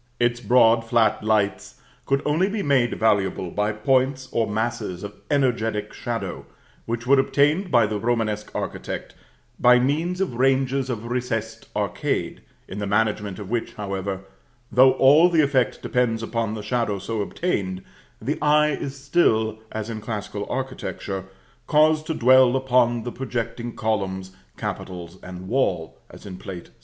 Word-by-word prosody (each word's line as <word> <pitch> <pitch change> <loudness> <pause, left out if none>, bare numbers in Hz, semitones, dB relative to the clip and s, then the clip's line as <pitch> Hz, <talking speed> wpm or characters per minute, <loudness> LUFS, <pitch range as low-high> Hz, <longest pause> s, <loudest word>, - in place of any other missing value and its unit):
Its 120 0 +2
broad 115 0 +4
flat 115 -1 +2
lights 105 -2 0 0.3
could 135 0 +1
only 160 +6 +2
be 205 -1 -2
made 130 -4 +2
valuable 100 -5 +1
by 105 +1 0
points 130 +4 +1
or 115 -1 +1
masses 105 -4 -2
of 100 - -6 0.2
energetic 115 -7 0
shadow, 120 -1 -4 0.4
which 115 +1 -3
were 135 +1 +5
obtained 150 +7 +2
by 120 -3 +5
the 105 0 -2
Romanesque 110 -2 -1
architect - - -5 0.5
by 125 0 +6
means 155 +8 0
of 195 -8 -1
ranges 135 0 +2
of 115 -2 -4
recessed 115 -3 -3
arcade, - - -2 0.3
in 95 - -6
the 100 - -2
management 105 -1 0
of 105 -1 -8
which, 120 -1 -2
however, 100 -1 -4 0.5
though 130 +1 +6
all 150 +6 +6
the 165 -3 +4
effect 130 -5 +1
depends 115 -3 0
upon 115 -2 -2
the 105 - -6
shadow 115 -2 -1
so 105 +3 -3
obtained, 100 - -2 0.4
the 140 +8 -2
eye 150 0 +4
is 140 -1 -4
still, 110 -7 +2
as 110 -1 -4
in 110 -2 -5
classical 105 -2 -5
architecture, 125 -7 -4 0.4
caused 155 0 +3
to 160 - -1
dwell 130 0 +5
upon 125 -3 +2
the 120 - -4
projecting 120 -2 -4
columns, 95 -4 -2 0.3
capitals, 90 0 -6
and 90 0 -9
wall, 95 -9 0
as - - -14
in 95 -2 -7
Plate 90 -2 -8
VI. - - -28
115 Hz, 150 wpm, -23 LUFS, 105-130 Hz, 0.5 s, by